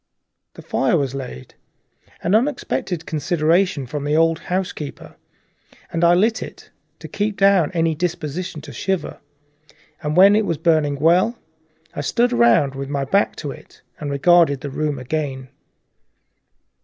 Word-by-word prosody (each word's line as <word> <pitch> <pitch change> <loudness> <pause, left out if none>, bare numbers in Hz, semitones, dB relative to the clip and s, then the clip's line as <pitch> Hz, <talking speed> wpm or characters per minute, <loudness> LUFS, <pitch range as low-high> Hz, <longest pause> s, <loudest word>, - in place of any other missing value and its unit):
The - - -11
fire 135 +6 +1
was 135 -3 -1
laid 125 - -8 0.7
an 175 - 0
unexpected 220 - -1
consideration 160 +1 +1
from 145 +3 -5
the 145 +1 0
old 165 0 +3
housekeeper 180 -5 -5 0.8
and 165 - -1
I 170 +1 +6
lit 220 +5 +2
it, - - -10 0.3
to - - -10
keep 205 0 -2
down 195 -5 +4
any 165 -1 +1
disposition 165 -1 -4
to - - -11
shiver, 190 -2 -3 0.8
and 150 +2 -2
when 200 +2 +7
it 215 -1 +1
was 165 - -1
burning 155 -2 +2
well 175 - +2 0.6
I - - -4
stood 240 - +1
round 120 +4 +4
with 135 0 -6
my 140 -1 -2
back 200 +9 +1
to 140 - -3
it 155 - -15 0.2
and 150 - -4
regarded 140 -1 +3
the 145 - -6
room 150 0 -2
again. 130 0 -4
160 Hz, 145 wpm, -20 LUFS, 140-180 Hz, 0.8 s, when